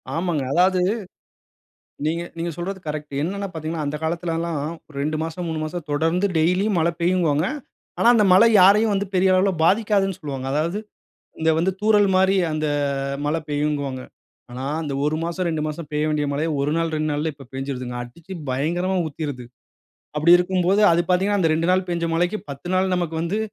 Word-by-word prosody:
ஆமாங்க. 165 -5 -1
அதாவது 185 +1 +3 1.3
நீங்க 165 +2 0 0.2
நீங்க 170 +1 -2
சொல்றது 190 +3 -4
கரெக்ட் 150 -1 -5
என்னன்னா 200 +5 -2
பார்த்தீங்கன்னா, 160 -1 -4
அந்த 145 +1 -2
காலத்துல 170 +1 -2
எல்லாம் 165 -3 -2 0.4
2 155 +2 -1
மாசம், 165 +2 -4
3 160 -1 -3
மாசம் 160 +1 -5
தொடர்ந்து 165 +6 +1
டெய்லியும் 180 +4 +2
மழ 165 +1 +2
பெய்யும்பாங்க. 170 -3 +2 0.5
ஆனா 235 - +4
அந்த 215 -3 +4
மழை 200 +5 +7
யாரையும் 205 +3 +6
வந்து 200 +1 -1
பெரிய 185 +1 +4
அளவுல 185 +2 +3
பாதிக்காதுன்னு 200 -1 +2
சொல்வாங்க. 135 -3 -5
அதாவது 165 +7 0 0.6
இந்த 160 - +3
வந்து 180 +3 +2
தூறல் 210 -2 +4
மாரி 190 +1 +4 0.2
அந்த 155 0 -1 0.6
மழ 150 +2 +1
பெய்யுன்பாங்க 145 -3 -1 0.5
ஆனா 130 +2 -5 0.2
அந்த 145 -3 -4
1 155 +1 +1
மாசம், 170 +2 -2
2 160 -2 -1
மாசம் 155 0 -6
பெய்ய 150 +1 0
வேண்டிய 150 -1 0
மழையே 155 +3 -1
1 145 +1 0
நாள், 165 -1 0
2 155 0 -1
நாள்ல 150 +1 -1
இப்ப 135 -3 -14
பெஞ்சுடுதுங்க. 130 -2 -4
அடிச்சு 165 +10 -10 0.2
பயங்கரமா 175 +8 0
ஊத்திருது. 145 -4 -5 0.7
அப்டி 165 +3 +3
இருக்கும்போது 185 +2 +1
அது 170 - +3
பார்த்தீங்கன்னா, 195 +3 +2
அந்த 165 - +3
2 165 +2 0
நாள் 185 0 +2
பெஞ்ச 170 -1 -1
மழைக்கு, 175 +5 +1
10 140 +5 -8
நாள் 185 0 +1
நமக்கு 175 -3 -2
வந்து 175 +5 -1
165 Hz, 170 wpm, -22 LUFS, 150-185 Hz, 1.3 s, மழை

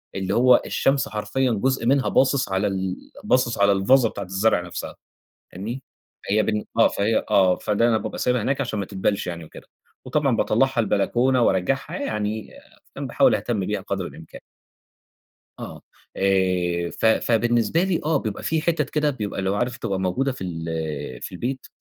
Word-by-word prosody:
اللي 95 0 -2
هو 125 +1 +5
الشَّمس 135 0 +1
حرفيًّا 110 +4 -1
جُزء 130 +3 0
منها 135 +1 +2
باصص 135 -3 +2
على 95 +2 0
ال 95 -1 -2 0.3
باصص 125 -2 +1
على 100 0 +5
الفازة 115 +5 +4
بتاعة 100 - -6
الزَّرع 95 +1 +1
نفسها، 85 -1 -7 0.6
فاهمني؟ 115 +8 -6 0.5
فهي 105 +1 +3
بالن 105 0 -1
آه، - - +7
فهي 110 +3 0
آه، 95 -3 +5
فده 105 +3 +1
أنا 110 -2 +3
بابقى - - -5
سايبها 125 -2 +1
هناك 135 +4 0
عشان 110 -5 -3
ما 100 - -2
تدبلش 100 0 -1
يعني 85 -2 -5
وكده، - - -14 0.4
وطبعًا 140 -5 +1
باطّلعها 130 +3 +1
البلكونة 120 +4 +2
وأرجّعها 115 +7 0
يعني، 105 -4 -3 0.4
فاهم، - - -4
باحاول - - +3
أهتم 105 -6 -2
بيها 105 -2 -2
قدر 95 -2 -3
الإمكان. 80 -1 -12 1.2
آه، - - -8 0.4
آآ 90 -3 +1
ف - - 0
فبالنسبة 120 - +2
لي 190 -3 0
آه، 155 -2 +2
بيبقى 110 -6 -5
في 160 -1 0
حِتت 160 -4 0
كده 150 -1 +1
بيبقى 105 -7 -4
اللي 95 0 -1
هو 100 - 0
عارف 120 +3 -1
تبقى 95 -1 -3
موجودة 130 +9 0
في 125 - -8
ال 80 -6 -4
في - - -6
البيت 125 +8 -4
110 Hz, 170 wpm, -23 LUFS, 95-130 Hz, 1.2 s, آه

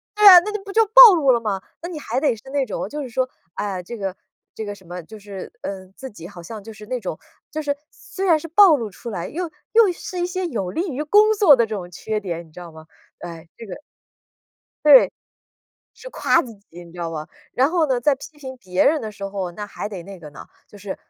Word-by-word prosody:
对 420 0 +3
啊， 365 -2 +12
那 405 +5 -5
你 425 - -3
不 395 - -7
就 450 +2 +4
暴 460 -1 +10
露 300 -6 +1
了 235 - +3
嘛， 205 -4 -3 0.2
那 - - -4
你 335 -4 -7
还 245 -2 -2
得 275 -5 +1
是 215 - -16
那 280 -1 0
种 205 -3 -5
就 295 -1 -5
是 255 - -7
说， 255 +2 -1 0.2
唉 205 - -3
呀， 180 - -7
这 235 +7 -8
个 195 -3 -4 0.4
这 220 - -5
个 205 - -5
什 190 -2 -19
么， 175 +1 -7
就 215 +6 -12
是， 200 -2 -9
嗯， 190 -1 -7
自 265 -1 -8
己 170 -4 -11
好 180 -3 -12
像 210 +3 -9
就 225 - -10
是 210 0 -12
那 250 +2 -3
种 180 -6 -5 0.3
就 310 - -5
是 285 -1 -1
虽 390 0 -8
然 325 -3 +4
是 330 - -8
暴 345 0 +6
露 230 - -4
出 235 - -9
来， 175 -5 -5
又 345 +1 -4 0.2
又 445 -4 +5
是 360 +1 -7
一 350 - 0
些 370 0 -3
有 220 - -3
利 345 - -3
于 290 - -3
工 420 +7 +5
作 390 -9 +6
的 235 -2 +2
这 220 -1 -5
种 180 -3 -7
缺 215 +5 -4
点， 170 -4 -6
你 160 - -22
知 180 - -12
道 175 -1 -10
吗？ 160 0 -14 0.3
哎， 170 -1 -9
这 230 - -9
个 195 - -8 1.1
对。 285 -3 +8 0.9
是 - - -9
夸 275 - +2
自 235 -3 -10
己 175 -4 -15
你 170 - -16
知 175 - -13
道 165 -1 -3
吧， 155 -1 -6 0.3
然 260 +2 +3
后 330 -5 +2
呢， 255 -2 0
在 280 +4 +3
批 295 +2 -13
评 260 -2 -8
别 185 -4 0
人 305 +1 +3
的 220 - -6
时 200 -1 -9
候， 195 -2 -4
那 205 +4 -7
还 205 - -6
得 195 -4 -7
那 195 +1 -10
个 150 - -11
呢， 140 - -12 0.2
就 205 - -15
是 200 -1 -6
225 Hz, 280 characters per minute, -21 LUFS, 190-310 Hz, 1.1 s, 啊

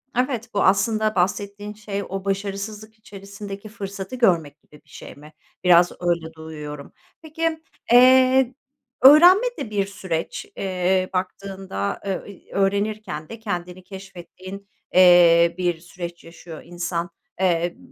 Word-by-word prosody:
Evet, 245 -2 -1
bu 200 - +1
aslında 215 +2 +2
bahsettiğin 200 +3 -2
şey 205 -1 -5
o 195 0 -5
başarısızlık 200 +2 -4
içerisindeki 200 0 -10
fırsatı 200 0 -7
görmek 165 - +1
gibi 150 - -20
bir - - -28
şey - - -11
mi? 150 +2 -15 0.3
Biraz 175 -1 +5
öyle 170 -2 -1
duyuyorum. 150 -2 -9 0.3
Peki, 320 0 -3 0.3
eee, 255 +1 +6 0.5
öğrenme 350 - +8
de - - -5
bir 205 -2 0
süreç, 185 -4 -5
eee, 185 0 0
baktığında, 190 - -4
eee, 195 0 -5
öğrenirken 200 -5 -2
de 230 - -9
kendini 180 -4 -5
keşfettiğin, 190 +1 -11 0.3
eee, 170 -2 +6
bir 175 -2 -1
süreç 175 0 -9
yaşıyor 165 -1 -11
insan. 175 0 -4 0.3
Eee, 175 -2 0
195 Hz, 120 wpm, -22 LUFS, 175-210 Hz, 0.5 s, öğrenme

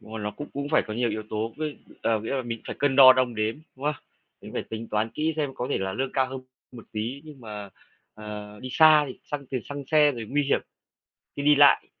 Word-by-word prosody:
Đúng - - -15
rồi, 110 - -5
nó 105 - -2
cũng 145 - -8
cũng 140 +1 -4
phải 155 - +3
có 110 - -5
nhiều 120 +1 0
yếu 110 - -3
tố, 110 +1 -2
với, 155 -1 -4 0.2
ờ, 110 -1 +1
nghĩa 110 - -5
là 130 - -1
mình 115 -2 -5
phải - - -5
cân 140 -2 +1
đo 130 -2 +11
đong 125 -2 0
đếm, 110 +1 0 0.2
đúng 135 - -9
không? 150 - +1 0.5
Mình - - -10
cũng - - -13
phải - - -2
tính 110 +1 -5
toán 110 +1 0
kỹ 155 +5 -1
xem 145 -3 -2
có 125 -1 -3
thể - - +1
là 95 0 -2
lương 135 +5 -2
cao 130 -1 +2
hơn 130 0 -6 0.3
một 120 -3 -11
tí, 115 +6 -4
nhưng 150 -4 -12
mà, 105 -3 -8 0.4
ờ, 105 -1 -8
đi 130 - -6
xa 155 -2 +7
thì - - -9
xăng 140 -2 -5
tiền 130 -1 -3
xăng 145 -1 -6
xe 150 -2 +5
rồi 115 -3 -6
nguy 145 +1 +2
hiểm 140 - +2 0.8
khi 140 - -4
đi 150 0 +6
lại. 145 0 +6
130 Hz, 265 wpm, -26 LUFS, 110-145 Hz, 0.8 s, đo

